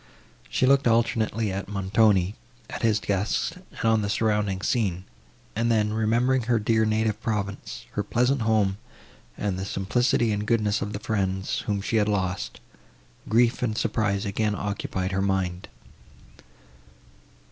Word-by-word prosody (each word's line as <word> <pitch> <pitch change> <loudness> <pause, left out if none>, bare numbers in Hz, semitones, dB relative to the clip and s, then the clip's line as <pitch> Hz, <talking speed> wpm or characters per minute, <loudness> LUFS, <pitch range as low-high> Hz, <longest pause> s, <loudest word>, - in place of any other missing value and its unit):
She - - +1
looked 135 0 +4
alternately 115 -2 +1
at 100 +1 -4
Montoni, 100 -1 +2 0.4
at - - -5
his 110 -2 +3
guests 100 - 0
and 180 -9 -9
on 110 -1 +4
the 100 - -2
surrounding 105 -3 0
scene; 95 -7 0 0.5
and 115 +2 +1
then, 105 -1 +2
remembering 120 +4 +2
her 120 - +4
dear 110 +1 +2
native 110 0 0
province, 100 -3 -4
her - - -1
pleasant 125 +2 +1
home 105 -3 +2 0.6
and 100 -3 -2
the - - -3
simplicity 110 +4 +1
and 105 0 -2
goodness 105 -3 +1
of 105 +1 -3
the 100 - -4
friends, 95 -3 -1
whom 100 -2 0
she 110 +3 0
had 105 -1 +2
lost, 95 -3 -2 0.7
grief 115 +2 +3
and 110 -3 -1
surprise 105 -3 0
again 105 +1 0
occupied 100 -2 -3
her 95 +1 0
mind. 95 -2 -1
105 Hz, 145 wpm, -25 LUFS, 100-115 Hz, 0.7 s, looked